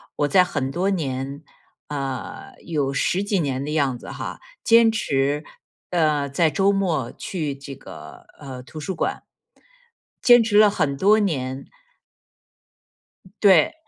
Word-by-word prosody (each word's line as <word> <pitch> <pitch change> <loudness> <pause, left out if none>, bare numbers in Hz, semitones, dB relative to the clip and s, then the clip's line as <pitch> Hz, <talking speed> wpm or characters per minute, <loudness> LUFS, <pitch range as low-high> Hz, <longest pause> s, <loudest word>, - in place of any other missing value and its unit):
我 145 - +1
在 185 +4 +5
很 145 -7 -3
多 180 +6 0
年 140 -5 -3 0.5
呃， 135 -3 -5
有 145 -5 -1
十 180 +8 0
几 200 -2 0
年 135 -3 -2
的 150 - -4
样 140 -5 +1
子 - - -11
哈， - - -6 0.2
坚 230 -1 +6
持 145 -8 0 0.5
呃， 155 -5 +1
在 155 +4 +2
周 195 +7 +2
末 165 -11 -1
去 155 -7 -4
这 140 0 -9
个， - - -12
呃， 130 -3 -8
图 155 +4 -10
书 180 +5 -4
馆。 - - -2 1.0
坚 240 -1 +8
持 220 -2 +1
了 210 -1 +7
很 140 -8 -1
多 205 +9 +4
年。 135 -9 -2 1.8
对。 190 -7 +5
150 Hz, 145 characters per minute, -23 LUFS, 135-195 Hz, 1.8 s, 坚